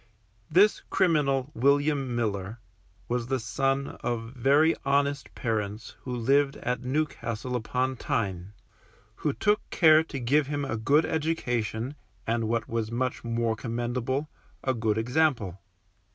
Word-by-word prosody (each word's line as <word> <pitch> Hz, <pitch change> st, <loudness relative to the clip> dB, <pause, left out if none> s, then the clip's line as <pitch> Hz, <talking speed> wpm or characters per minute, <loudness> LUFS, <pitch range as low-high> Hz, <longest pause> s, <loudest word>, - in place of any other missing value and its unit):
This 205 Hz, +4 st, +4 dB
criminal 145 Hz, -7 st, +2 dB
William 140 Hz, 0 st, +2 dB
Miller, 105 Hz, -2 st, -2 dB, 0.5 s
was 120 Hz, -1 st, -1 dB
the 130 Hz, 0 st, 0 dB
son 135 Hz, +3 st, -1 dB
of 115 Hz, 0 st, -3 dB
very 145 Hz, +6 st, +4 dB
honest 140 Hz, 0 st, 0 dB
parents 110 Hz, -1 st, -3 dB
who 125 Hz, -1 st, -4 dB
lived 135 Hz, +4 st, +2 dB
at 125 Hz, +1 st, -2 dB
Newcastle 125 Hz, -3 st, -2 dB
upon 125 Hz, +2 st, -1 dB
Tyne, 95 Hz, -4 st, -2 dB, 0.6 s
who 150 Hz, -, 0 dB
took 210 Hz, +8 st, +1 dB
care 160 Hz, -2 st, +6 dB
to 140 Hz, -, -5 dB
give 135 Hz, +4 st, +2 dB
him 145 Hz, -1 st, -2 dB
a 125 Hz, -, -2 dB
good 140 Hz, +8 st, +3 dB
education, 125 Hz, -6 st, -1 dB, 0.3 s
and 115 Hz, 0 st, 0 dB
what 115 Hz, 0 st, -1 dB
was 115 Hz, -1 st, -2 dB
much 125 Hz, +2 st, -2 dB
more 115 Hz, -1 st, 0 dB
commendable, 120 Hz, +5 st, -2 dB, 0.4 s
a 130 Hz, -, +1 dB
good 110 Hz, -3 st, 0 dB
example. 115 Hz, -, +1 dB
125 Hz, 130 wpm, -27 LUFS, 115-140 Hz, 0.6 s, care